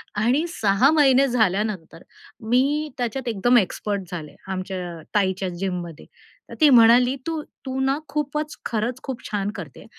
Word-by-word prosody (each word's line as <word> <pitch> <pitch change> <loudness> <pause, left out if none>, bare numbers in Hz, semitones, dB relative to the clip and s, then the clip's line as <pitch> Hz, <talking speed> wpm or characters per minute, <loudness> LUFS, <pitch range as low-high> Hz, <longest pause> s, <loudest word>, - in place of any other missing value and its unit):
आणि 245 +10 +2
6 215 - +3
महिने 275 -3 +4
झाल्यानंतर 210 -7 -1 0.5
मी 290 +5 +2
त्याच्यात 245 +1 -3
एकदम 235 +2 +3
एक्सपर्ट 205 -1 -1
झाले. 160 -4 -7
आमच्या 185 -2 -5 0.2
ताईच्या 190 -2 +1
जिममध्ये. 175 -3 -5 0.4
तर - - -9
ती 305 - +7
म्हणाली, 245 +1 +6
"तू, 325 -1 -2 0.2
तू 260 0 -3
ना 270 +1 +1
खूपच, 300 +1 -3
खरंच 235 +3 -2
खूप 265 -3 -5
छान 205 -1 -1
करते 165 - -9
230 Hz, 140 wpm, -23 LUFS, 190-265 Hz, 0.5 s, ती